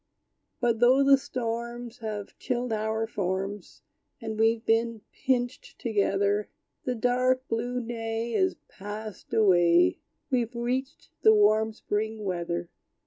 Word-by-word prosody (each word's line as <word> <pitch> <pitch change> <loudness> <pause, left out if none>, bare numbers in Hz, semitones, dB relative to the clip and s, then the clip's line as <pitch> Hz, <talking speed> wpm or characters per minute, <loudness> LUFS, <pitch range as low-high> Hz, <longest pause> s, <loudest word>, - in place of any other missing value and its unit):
But 235 -2 +1
though 255 +3 +5
the 275 0 +7
storms 235 -2 -4
Have 215 -3 -5
chilled 245 -1 -2
our 220 +1 -1
forms, 195 -1 -4 0.4
And 220 -3 -5
we've 225 0 +2
been 225 0 +1
pinched 245 -1 -2
together, 205 -2 +1 0.4
The 250 - 0
dark, 255 +2 +1
blue 240 +2 -1
day 225 0 -3
Is 375 +5 +2
passed 210 +1 -8
away; 175 -5 +4 0.3
We've 240 -2 0
reached 255 +3 -3
the 220 - +7
warm 215 +1 +4
spring 215 0 -3
weather! 175 -2 -2
225 Hz, 120 wpm, -27 LUFS, 210-245 Hz, 0.4 s, the